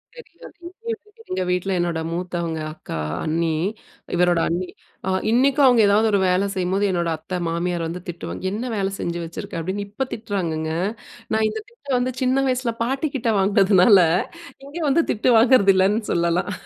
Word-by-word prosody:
தெரியாது! 340 -9 -14
இங்கயும் 455 +3 -6
வந்து 420 +2 -19
எங்க 185 0 -1
வீட்டில 180 +1 0
என்னோட 170 -2 -1
மூத்தவங்க 170 -2 -3
அக்கா, 80 - -7 0.3
அண்ணி, 165 +1 0 0.6
இவரோட 175 -1 +3
அண்ணி, 180 +2 -2 0.4
அ - - +1 0.2
இன்னிக்கும் 270 +4 +4
அவங்க 245 -3 +5
எதாவது 215 +2 +4
ஒரு 200 - +3
வேல 185 +2 +2
செய்யும்போது 190 +2 0
என்னோட 170 -2 0
அத்த 180 +3 -5
மாமியார் 170 0 -1
வந்து 175 +2 -6
திட்டுவாங்க. 175 +1 -6
"என்ன 235 +5 -3
வேல 195 -2 0
செஞ்சு 170 0 -3
வச்சுருக்க?" 165 0 -6
அப்படின்னு 190 +4 -3
இப்ப 235 +6 -3
திட்டுறாங்கங்க. 170 -8 -3 0.6
நான் 220 0 +2
இந்த 440 - -5
திட்ட 470 -12 -25
வந்து 250 +1 -1
சின்ன 260 +1 +2
வயசில 250 -2 0
பாட்டி 270 +5 -1
கிட்ட 240 -3 0
வாங்கினதுனால, 195 0 +5 0.7
இங்க 285 +4 -9
வந்து 330 +5 +3
திட்டு 225 +4 +2
வாங்குறதில்லன்னு 205 -3 +4
சொல்லலாம். 170 +3 0
195 Hz, 160 wpm, -22 LUFS, 175-250 Hz, 0.7 s, அவங்க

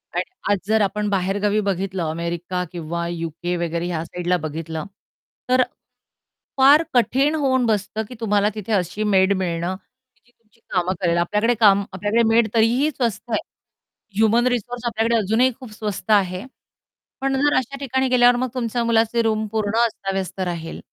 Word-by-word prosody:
आणि - - +1 0.3
आज 205 - +3
जर 220 0 +3
आपण 210 +1 0
बाहेरगावी 200 +2 0
बघितलं 190 -2 -2
अमेरिका 170 +2 -3
किंवा 170 0 -4 0.2
यूके 165 +1 -10
वगैरे 170 0 -2
ह्या 165 -2 -2
साइडला 180 +1 -1
बघितलं, 160 +1 -5 0.6
तर 255 0 +4 1.0
फार 280 +4 +7
कठीण 270 +5 +2
होऊन 260 -4 +1
बसतं 215 0 -1
की 250 - -9
तुम्हाला 210 -2 +2
तिथे 215 0 -6
अशी 195 +2 -1
मेड 195 -1 +3
मिळणं 175 0 -2 0.5
जी 240 - -29
तुमची 230 -2 -34
कामं 180 0 0
करेल. 170 -2 +2
आपल्याकडे 210 +7 +2
काम 200 -3 +5
आपल्याकडे 205 +5 +1
मेड 225 0 +4
तरीही 235 +6 +3
स्वस्त 240 -4 -3
आहे. 220 - +1 0.7
ह्युमन 220 +3 +3
रिसोर्स 245 0 -2
आपल्याकडे 230 0 +1
अजूनही 220 +5 +2
खूप 255 -5 -10
स्वस्त 210 -2 -4
आहे. 190 -1 +2 0.8
पण 270 0 0
जर 290 0 +3
अशा 260 +2 -2
ठिकाणी 265 -1 0
गेल्यावर 245 -1 +5
मग 255 +1 -1
तुमच्या 240 -1 -1
मुलाचे 230 0 +2
रूम 220 -1 0
पूर्ण 220 -1 -1
अस्ताव्यस्त 195 -4 -4
राहील, 170 -3 -4
210 Hz, 155 wpm, -22 LUFS, 185-235 Hz, 1.0 s, फार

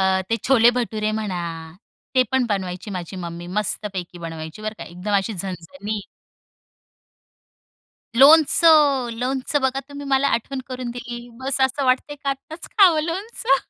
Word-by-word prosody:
अ 190 0 +3
ते 230 - +3
छोले-भटुरे 235 -4 +3
म्हणा 195 -5 -3 0.7
ते 255 - +6
पण 265 -1 +3
बनवायची 190 -1 -3
माझी 185 0 -6
मम्मी, 170 -1 -6
मस्तपैकी 190 -2 -3
बनवायची 165 +2 -7
बरं 215 0 -3
का, - - -6
एकदम 180 +4 -6
अशी 200 +3 -1
झणझणीत. 195 +4 -5 2.1
लोणचं, 295 -1 +6
लोणचं 260 +4 -1
बघा 265 0 0
तुम्ही 285 0 -8
मला 275 0 +2
आठवण 260 +3 -2
करून 255 -2 -5
दिली, 240 0 -7
बस 265 +1 -1
असं 265 +1 +2
वाटतंय 260 +3 +1
की 280 -1 -5
आत्ताच 275 +5 -5
खावं 360 -7 +6
लोणचं. 350 -4 0
240 Hz, 135 wpm, -22 LUFS, 190-275 Hz, 2.1 s, ते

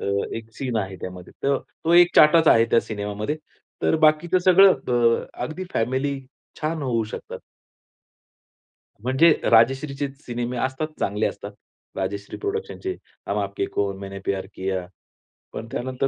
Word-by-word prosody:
अ, - - -5 0.3
एक 115 0 -8
सीन 125 -4 -3
आहे 95 -3 -3
त्यामध्ये. 90 -1 -8
तर 140 0 +2 0.3
तो 165 - +2
एक 175 0 +6
चाटाच 160 +1 +7
आहे 115 0 +6
त्या 115 - +5
सिनेमामध्ये. 105 +5 -4 0.5
तर - - +3
बाकीचं 165 +4 +3
सगळं 185 +1 +6
अ, 120 -3 +1 0.2
अगदी 160 +8 -4
फॅमिली 130 +4 0 0.4
छान 155 0 -2
होऊ 120 -4 0
शकतात. - - -7 1.6
म्हणजे 130 +8 +4 0.2
राजश्रीचे 135 +5 +3 0.2
सिनेमे 120 +1 -3
असतात 130 +5 -2
चांगले 105 +2 0
असतात. - - -7 0.4
राजश्री 100 +1 -4
प्रोडक्शनचे, 405 -2 -4 0.3
हम 100 - -1
आपके 100 0 -3
है - - -3
कौन, 100 -1 -1
मैंने 100 0 -7
प्यार 95 -1 -1
किया. 95 -1 -2 0.7
पण 115 - -6
त्यानंतर 130 +2 -2
125 Hz, 140 wpm, -23 LUFS, 105-155 Hz, 1.6 s, चाटाच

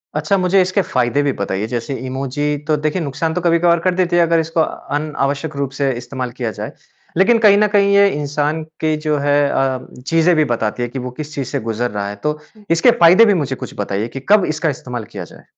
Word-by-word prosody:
अच्छा, 155 +6 +1
मुझे 185 +1 +3
इसके 185 +2 +1
फ़ायदे 125 -2 0
भी 140 - +1
बताइये 100 +2 -3
जैसे 120 +3 -4
इमोजी 140 +3 -2
तो 155 - +3
देखिए, 155 +4 -1
नुकसान 160 +3 -2
तो 180 - -2
कभी-कभार 170 0 +3
कर 185 +1 0
देती 180 -1 +1
हैं 170 - +5
अगर, 165 0 +2
इसको 160 0 0 0.3
अनावश्यक 150 0 -2
रूप 140 -1 -2
से 140 -2 +1
इस्तेमाल 125 0 -5
किया 115 -3 -2
जाए। - - -5 0.5
लेकिन 230 +5 +5
कहीं 200 -1 +7
न 210 0 +4
कहीं 200 -1 +3
ये 200 0 +6
इंसान 150 +1 -2 0.2
के 155 -1 +1
जो 150 -1 +1
है 145 0 +2
अ, 135 -1 0 0.3
चीज़ें 165 +1 +3
भी 155 -1 +3
बताती 115 +1 -1
है 120 - -3
कि 130 - -5
वो 125 0 -5
किस 150 0 -8
चीज़ 135 -3 -3
से - - -2
गुज़र 120 +1 -2
रहा 100 -1 -3
है। 100 - -6
तो, 150 0 -1 0.3
इसके 170 +9 +5
फ़ायदे 190 -1 +6
भी 210 - +4
मुझे 130 -1 -3
कुछ - - -8
बताइए 100 +2 -2
कि - - -2
कब 205 -3 +5
इसका 155 +1 -1
इस्तेमाल 125 -4 -5
किया - - -4
जाए? - - -15
150 Hz, 225 wpm, -18 LUFS, 130-170 Hz, 0.5 s, कहीं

